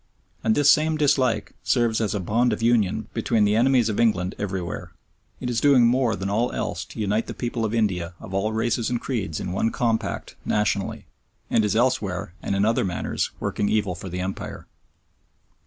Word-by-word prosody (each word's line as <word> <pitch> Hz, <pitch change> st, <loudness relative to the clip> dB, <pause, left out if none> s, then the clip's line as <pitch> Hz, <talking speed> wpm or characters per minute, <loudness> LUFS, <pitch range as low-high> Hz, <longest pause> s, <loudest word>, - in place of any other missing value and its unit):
And 110 Hz, -, +3 dB
this 145 Hz, 0 st, +6 dB
same 155 Hz, +1 st, +3 dB
dislike 135 Hz, -5 st, +2 dB
serves 115 Hz, -3 st, +2 dB
as 105 Hz, -1 st, 0 dB
a -, -, 0 dB
bond 115 Hz, +6 st, +1 dB
of 110 Hz, -, -4 dB
union 115 Hz, -5 st, +2 dB
between 110 Hz, -2 st, +2 dB
the 105 Hz, +1 st, +2 dB
enemies 125 Hz, 0 st, +4 dB
of 110 Hz, -, -2 dB
England 95 Hz, -6 st, +2 dB
everywhere. 95 Hz, -3 st, -4 dB, 0.5 s
It 125 Hz, -, -4 dB
is 120 Hz, -1 st, 0 dB
doing 135 Hz, -4 st, +6 dB
more 120 Hz, -2 st, +2 dB
than 95 Hz, +1 st, -4 dB
all 115 Hz, +5 st, 0 dB
else -, -, -3 dB
to -, -, -11 dB
unite 105 Hz, +2 st, 0 dB
the -, -, -6 dB
people 120 Hz, -2 st, -3 dB
of 110 Hz, -, 0 dB
India 95 Hz, -6 st, 0 dB
of 95 Hz, -, -10 dB
all 100 Hz, +3 st, 0 dB
races 110 Hz, +1 st, 0 dB
and 120 Hz, -1 st, -1 dB
creeds 105 Hz, -, -3 dB
in 90 Hz, -, -4 dB
one 100 Hz, +5 st, +1 dB
compact 115 Hz, -1 st, -2 dB
nationality, 105 Hz, -2 st, -1 dB, 0.5 s
and 110 Hz, -, +3 dB
is 105 Hz, 0 st, 0 dB
elsewhere, 105 Hz, -8 st, 0 dB
and 100 Hz, -, -2 dB
in 100 Hz, +1 st, +2 dB
other 115 Hz, +1 st, +2 dB
manners, 90 Hz, -2 st, -2 dB
working 100 Hz, -, -1 dB
evil 105 Hz, -3 st, +1 dB
for 90 Hz, +2 st, -8 dB
the 90 Hz, +1 st, -4 dB
Empire. 95 Hz, +1 st, -5 dB
110 Hz, 190 wpm, -24 LUFS, 100-120 Hz, 0.5 s, this